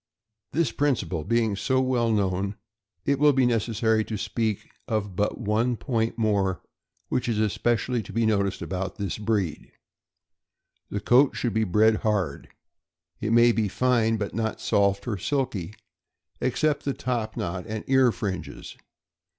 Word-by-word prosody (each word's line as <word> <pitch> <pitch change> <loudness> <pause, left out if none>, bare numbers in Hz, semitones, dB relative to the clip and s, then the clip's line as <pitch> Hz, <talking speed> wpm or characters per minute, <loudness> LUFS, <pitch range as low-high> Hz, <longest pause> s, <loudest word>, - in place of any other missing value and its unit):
This 165 0 +1
principle 100 - 0
being 115 +1 +1
so 130 +6 +1
well 125 -3 +1
known, 100 -1 0 0.5
it 140 -1 +1
will 150 0 +5
be 130 -1 +3
nec 115 -2 +2
essary 110 0 +1
to 110 - -3
speak 110 0 -2 0.2
of 105 -4 -2
but 105 +3 0
one 115 +4 0
point 115 -3 -1
more 100 -5 +1 0.5
which 125 - -1
is 115 - 0
especially 115 +3 0
to 100 - -10
be 115 0 +1
noticed 100 -3 0
about 95 -1 -4
this 100 0 -4
breed. 105 -8 -2 1.2
The 100 - -3
coat 125 +6 +4
should 120 -4 -1
be 110 +1 +1
bred 110 +3 +4
hard. 100 -10 -1 0.7
It 110 - -2
may 120 +1 +6
be 110 -2 0
fine, 115 0 +2
but 100 -1 -4
not 110 0 -2
soft 100 0 +1
or 105 -5 -2
silky, 105 - -2 0.6
except 145 +4 0
the 140 - -2
top 120 -4 -3
knot 90 +1 -3
and 110 -1 -4
ear 130 -2 +4
fringes. 95 -5 -5
110 Hz, 150 wpm, -26 LUFS, 100-120 Hz, 1.2 s, may